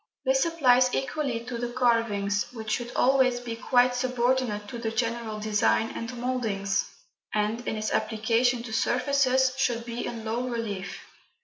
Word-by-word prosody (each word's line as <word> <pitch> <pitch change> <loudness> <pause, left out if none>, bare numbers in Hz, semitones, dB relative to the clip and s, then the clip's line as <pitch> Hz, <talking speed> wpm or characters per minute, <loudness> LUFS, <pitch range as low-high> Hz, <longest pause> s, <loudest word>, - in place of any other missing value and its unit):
This 265 +4 +3
applies 255 -6 +4
equally 270 -4 -2
to 240 0 -6
the 240 0 -2
carvings, 230 -5 +1
which 220 -2 -5
should 240 0 -2
always 255 -1 +3
be 240 -2 -5
quite 245 +2 +3
subordinate 250 -3 0
to 240 - -6
the 230 -1 -2
general 230 -1 -2
design 215 +1 +1
and 230 +2 -6
mouldings, 220 -6 -1 0.5
and 215 +2 0
(in - - -1
its 215 0 -2
application 230 +2 +1
to 230 -2 -7
surfaces) 260 +2 +2
should 235 -3 0
be 235 0 -4
in 230 -2 -6
low 235 +3 -2
relief. 210 -5 -4
235 Hz, 150 wpm, -27 LUFS, 220-255 Hz, 0.5 s, applies